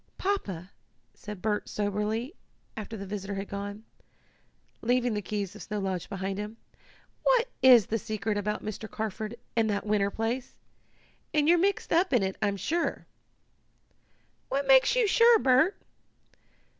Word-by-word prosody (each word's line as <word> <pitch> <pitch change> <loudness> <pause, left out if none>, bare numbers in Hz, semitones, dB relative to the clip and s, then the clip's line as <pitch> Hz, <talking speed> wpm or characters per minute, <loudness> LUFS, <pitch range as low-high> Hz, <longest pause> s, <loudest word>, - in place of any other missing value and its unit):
"Papa," 200 - -2 0.4
said 210 -3 -9
Bert 210 -1 -1
soberly, 210 - -2 0.4
after 220 +1 -6
the 200 - -6
visitor 200 0 -5
had 195 +1 -4
gone, 205 +1 -6 1.0
leaving 245 0 +1
the 210 - -1
keys 205 -1 -3
of 210 - -10
Snow 210 - -4
Lodge 190 -3 -3
behind 195 0 -3
him, 210 +2 -6 0.6
"what - - +3
is 245 -5 +8
the 225 - -1
secret 215 0 -2
about 210 +1 -2
Mr. 215 +1 -5
Carford 220 +1 -4 0.2
and 225 -1 +2
that 200 0 -1
winter 205 -1 +2
place? 230 +5 -3 0.8
And 300 -1 +3
you're 345 +1 +6
mixed 395 0 0
up 345 0 +3
in 240 -5 +4
it, 190 0 -1
I'm 200 -1 +1
sure." 335 - -1 1.4
"What 280 +1 0
makes 270 - +6
you - - +4
sure, 465 +3 +6
Bert?" 270 +3 +3
215 Hz, 145 wpm, -28 LUFS, 200-260 Hz, 1.4 s, is